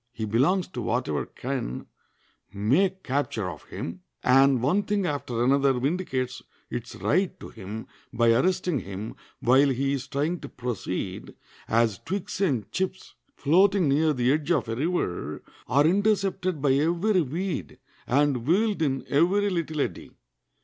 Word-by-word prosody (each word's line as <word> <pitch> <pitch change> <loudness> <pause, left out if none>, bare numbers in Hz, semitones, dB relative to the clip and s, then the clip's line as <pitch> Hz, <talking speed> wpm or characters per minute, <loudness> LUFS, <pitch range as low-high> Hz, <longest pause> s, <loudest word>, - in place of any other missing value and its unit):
He 110 -2 -4
belongs 140 - +2
to - - -5
whatever - - -1
can - - -4 0.7
make 180 - +1
capture 130 -7 -1
of 80 -4 -8
him; 90 +2 -6 0.2
and 135 0 +5
one 150 - +2
thing 205 -1 -1
after 130 -6 -2
another 135 +1 +4
vindicates 130 -2 -2 0.3
its 120 0 -5
right 185 +3 0
to - - -9
him 110 +1 -7 0.3
by 115 -1 +3
arresting 180 +3 +1
him 100 +2 -6 0.3
while 135 +4 +5
he 135 +1 0
is 130 -2 -3
trying 150 +6 -1
to 140 - -8
proceed, 100 -6 -4 0.3
as 115 -3 +2
twigs 195 +1 -4
and 135 - 0
chips 190 0 -3 0.2
floating 185 +3 +3
near 155 +3 +3
the 125 -2 +2
edge 150 +1 -2
of 165 -8 +2
a 115 - -1
river 155 - -2 0.2
are 140 +4 +4
intercepted 190 -3 +1
by 135 -2 +4
every 170 +7 +2
weed, 155 - -3 0.3
and 135 -2 +2
whirled 200 +2 +2
in 135 -4 0
every 195 +7 +3
little 160 -4 -1
eddy. - - -3
140 Hz, 145 wpm, -26 LUFS, 120-180 Hz, 0.7 s, and